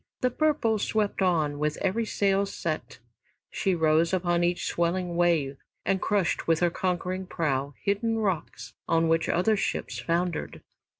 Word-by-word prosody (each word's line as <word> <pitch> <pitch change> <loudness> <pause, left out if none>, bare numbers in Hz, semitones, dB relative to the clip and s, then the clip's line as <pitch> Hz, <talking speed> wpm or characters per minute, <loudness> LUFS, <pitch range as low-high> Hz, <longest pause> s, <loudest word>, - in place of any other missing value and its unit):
"The 255 - +2
Purple" 270 -6 +1
swept 210 -1 0
on, 155 -6 +1
with 150 0 0
every 215 +4 0
sail 200 -1 +1
set, - - -4 0.5
she 190 -3 0
rose 160 +1 +3
upon 175 -2 +1
each 175 0 0
swelling 175 +1 -1
wave 165 -6 +2 0.3
and 190 - +1
crushed 200 -5 0
with 165 -1 +3
her 175 -1 +3
conquering 185 +1 -2
prow 140 -5 -1
hidden 225 +3 0
rocks 195 -7 -3
on 165 0 +2
which 165 0 +2
other 185 +5 +3
ships 200 - -2
foundered. 170 -1 -2
180 Hz, 145 wpm, -27 LUFS, 165-200 Hz, 0.5 s, rose